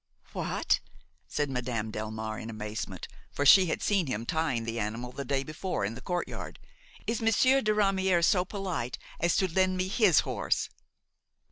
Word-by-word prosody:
"What!" - - 0 0.5
said 145 -2 -1
Madame 120 -4 -2
Delmare 110 0 -4
in 110 - -7
amazement, 110 0 -5 0.2
for 145 - -1
she 185 +6 +8
had 160 - -2
seen 195 -6 +2
him 115 -3 -3
trying 155 -5 0
the 115 0 -3
animal 115 +3 -3
the 140 - -5
day 135 0 0
before 155 - -3
in 105 - -3
the 115 - -9
courtyard, 180 -1 -4 0.5
"is 230 0 -1
Monsieur 255 +5 +4
de 215 - +1
Ramière 190 -4 +3
so 180 0 +4
polite 185 - -4 0.2
as 170 0 +2
to 190 - +3
lend 185 0 +2
me 185 0 0
his 195 - +4
horse?" - - -1
155 Hz, 165 wpm, -29 LUFS, 115-190 Hz, 0.5 s, she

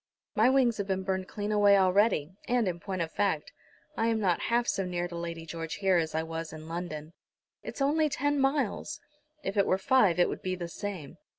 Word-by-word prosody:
"My - - +4
wings 260 -4 +3
have 200 -2 -3
been 190 -1 -1
burned 190 -1 -2
clean 205 0 -4
away 205 -1 +5
already, 190 -4 +3 0.2
and, 240 -3 +2
in 175 -1 -2
point 185 -1 -3
of 165 - -6
fact, 195 -7 0 0.4
I 225 - +1
am 225 -1 +1
not 185 -5 +2
half 235 +1 +2
so 195 - 0
near 175 -1 -2
to 175 - -8
Lady 170 -1 -5
George 165 -1 -5
here 190 -2 +2
as 160 -2 -1
I 160 - +1
was 165 0 -5
in 155 0 -9
London." 165 -2 -5 0.5
"It's 275 - -4
only 305 +2 +2
ten 290 +1 0
miles." 270 0 0 0.4
"If 195 +2 -3
it 200 - +4
were 185 - +3
five 195 -3 +3
it 175 - +4
would - - -5
be 185 0 -2
the 175 -1 -5
same. 180 -6 -6
190 Hz, 215 wpm, -29 LUFS, 170-220 Hz, 0.5 s, away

